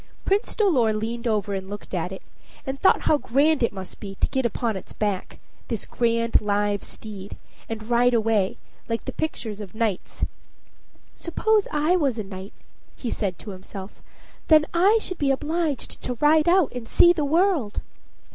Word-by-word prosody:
Prince 400 +3 +1
Dolor 280 - +3
leaned 230 +3 -3
over 210 -2 0
and 190 0 -4
looked 205 0 -8
at 180 0 -1
it, 190 - -8 0.4
and 270 +1 -4
thought 380 - +5
how 300 - +3
grand 285 +5 +2
it 235 - +2
must 190 -2 -8
be 195 -1 -7
to - - 0
get 265 -2 +1
upon 230 -1 -2
its 190 - -8
back 205 -3 -2 0.3
this 230 -4 -3
grand 230 -1 +1
live 205 -1 0
steed 205 -2 -8 0.3
and 220 -1 -5
ride 240 +1 +4
away, 220 -4 +1 0.3
like 230 0 -2
the - - -3
pictures 220 -9 -4
of 200 -1 -9
knights. 220 -5 -1 0.9
"Suppose 425 +5 +1
I 305 +5 +2
was 275 -8 +1
a 215 - -2
knight," 195 0 -9 0.4
he 240 - -4
said 190 -4 -2
to 210 - -8
himself; 190 +1 -9 0.5
"then 310 -1 +6
I 385 +6 +5
should 370 -4 -5
be 285 - +2
obliged 300 +1 -1
to 250 - -3
ride 305 +5 +4
out 360 -4 +4
and 245 -2 -6
see 345 - +6
the 315 -4 -1
world." 315 - +2
230 Hz, 175 wpm, -24 LUFS, 205-305 Hz, 0.9 s, then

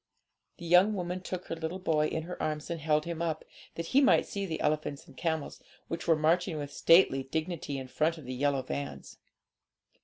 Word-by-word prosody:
The 170 - -9
young 180 +5 +5
woman 180 0 -3
took 185 -1 -5
her - - -4
little 165 +2 -4
boy 155 -5 +1
in 160 - -3
her 180 +2 -7
arms, 155 +1 -2
and 165 -2 -4
held 150 0 +2
him 170 -1 -4
up, 160 -2 -2 0.3
that 165 - -4
he 275 - +7
might 270 - +5
see 200 -1 -4
the 160 -2 -3
elephants 150 -1 -1
and - - -17
camels, 160 -3 -2 0.3
which 165 +1 -4
were 165 - +6
marching 165 +2 +1
with 145 -1 -5
stately 165 -6 +5
dignity 155 +1 -3
in 130 -1 -6
front 155 +5 0
of 155 - -11
the 130 - -5
yellow 135 0 +1
vans. 70 - -6
160 Hz, 205 wpm, -30 LUFS, 150-175 Hz, 0.3 s, he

